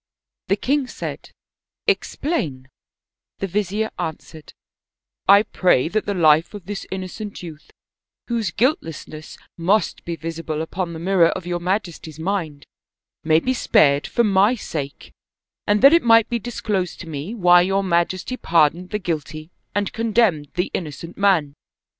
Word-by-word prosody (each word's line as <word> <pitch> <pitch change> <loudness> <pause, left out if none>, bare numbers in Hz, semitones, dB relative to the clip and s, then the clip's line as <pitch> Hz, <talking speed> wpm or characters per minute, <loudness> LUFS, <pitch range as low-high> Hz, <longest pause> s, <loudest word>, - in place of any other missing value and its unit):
The 195 - +3
king 270 +5 0
said, - - -7 0.3
" - - -56
Explain/' 150 - -1 0.7
The - - -2
vizier 210 +3 -1
answered: 160 0 -7 0.4
" 60 - -25
I 205 - +3
pray 180 -9 +2
that 215 +3 -1
the 205 - -1
life 160 +2 +4
of 200 -4 -9
this 205 +1 -6
inno 190 -1 -4
cent 205 0 -8
youth, 155 -3 -10 0.6
whose 230 -5 -1
guiltlessness 165 - -2 0.2
must 195 +6 +1
be 170 - -4
visible 165 -1 -4
upon 170 +1 -4
the 160 - -7
mirror 175 -1 +3
of 180 - -4
your 175 0 -2
majesty's 175 -4 -3
mind, 160 -4 -3 0.6
may 160 0 +4
be 255 +10 -1
spared 145 - +3
for 235 - +1
my 205 +3 +4
sake; 145 - -6 0.5
and 205 +3 +2
that 275 +3 +9
it 335 - +6
might 230 -2 +5
be 235 - -1
disclosed 210 -5 -3
to 170 - -9
me 160 +8 -5
why 175 -4 +6
your 195 +2 +1
majesty 185 +6 0
pardoned 170 +1 +2
the 210 - -1
guilty 155 -3 -5 0.2
and 205 -1 -1
condemned 220 -9 +1
the 180 +1 -1
innocent 165 +1 -5
man?" 185 -8 +2
180 Hz, 155 wpm, -21 LUFS, 160-210 Hz, 0.7 s, that